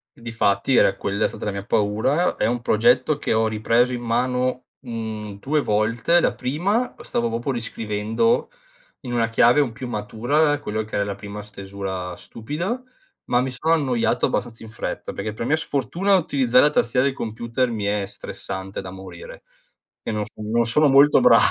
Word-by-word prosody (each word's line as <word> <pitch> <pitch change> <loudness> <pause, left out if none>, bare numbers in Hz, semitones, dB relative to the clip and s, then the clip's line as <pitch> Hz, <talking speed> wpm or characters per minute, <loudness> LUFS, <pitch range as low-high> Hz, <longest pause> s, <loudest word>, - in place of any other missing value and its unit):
Difatti, 115 0 0
era - - +4
quella 100 +1 -2
è - - +4
stata - - -7
la 105 - -1
mia 100 0 -6
paura. 110 +12 +1
È - - 0
un 120 0 0
progetto 155 - +3
che - - -1
ho 110 0 +2
ripreso 115 +3 +2
in 120 - -4
mano, 125 +2 0 0.2
mhmm, 110 -4 -6
2 150 +7 0
volte. 115 +10 +2
La - - +1
prima, 190 - -1
stavo 115 0 -1
proprio 120 +4 -2
riscrivendo 115 - -1 0.5
in 125 -3 -6
una 115 -1 +2
chiave 120 +4 +4
un 135 -5 +2
più 125 +2 -7
matura 125 +8 0
quello 110 -4 -3
che 110 - -16
era 100 - +2
la 100 -1 -4
prima 105 +1 -8
stesura 95 -3 -6
stupida, 170 - -5 0.4
ma 125 0 +2
mi 130 - -1
sono 155 +6 0
annoiato 125 -6 +1
abbastanza 115 -2 -3
in 110 - -10
fretta 110 - -5
perché, 105 +1 -4
per 115 - -4
mia 155 - +3
sfortuna, 165 +6 0
utilizzare 135 -6 +3
la - - +5
tastiera 125 -1 +2
del 135 - -2
computer 115 +2 -2
mi 105 -3 -3
è 100 -1 0
stressante 95 -1 -6
da 90 -1 -8
morire - - -10 0.6
e - - -4
non 105 -1 -1
non 110 +2 0
sono 150 +6 +3
molto 140 +1 +6
bra 120 -2 +7
115 Hz, 180 wpm, -22 LUFS, 105-135 Hz, 0.6 s, bra